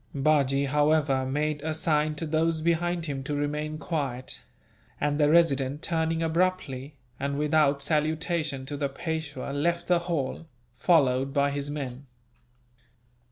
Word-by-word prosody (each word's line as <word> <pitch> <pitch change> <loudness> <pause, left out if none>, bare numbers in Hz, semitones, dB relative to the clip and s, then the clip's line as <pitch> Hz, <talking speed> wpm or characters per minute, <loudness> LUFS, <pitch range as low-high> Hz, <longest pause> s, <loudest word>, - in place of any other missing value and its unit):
Bajee, 140 -1 +2
however, 145 -2 +2
made 150 +2 -1
a 155 +1 -2
sign 155 -1 +1
to 165 - -4
those 160 +1 +1
behind 170 +1 0
him 140 -3 -3
to 145 +2 -3
remain 150 +1 -2
quiet; 135 -6 -4 0.6
and 145 +1 0
the 150 -1 +4
Resident, 145 -3 +3
turning 165 0 0
abruptly, 160 -5 -1 0.2
and 140 +1 -2
without 150 -2 +2
salutation 155 -2 0
to 145 +2 -5
the 140 -1 -1
Peishwa, 160 -3 -4
left 170 +4 0
the 175 -1 +3
hall, 165 -2 -3 0.3
followed 135 -2 +2
by 140 0 +3
his 140 0 -3
men. 140 -2 -5
150 Hz, 135 wpm, -27 LUFS, 140-160 Hz, 0.6 s, the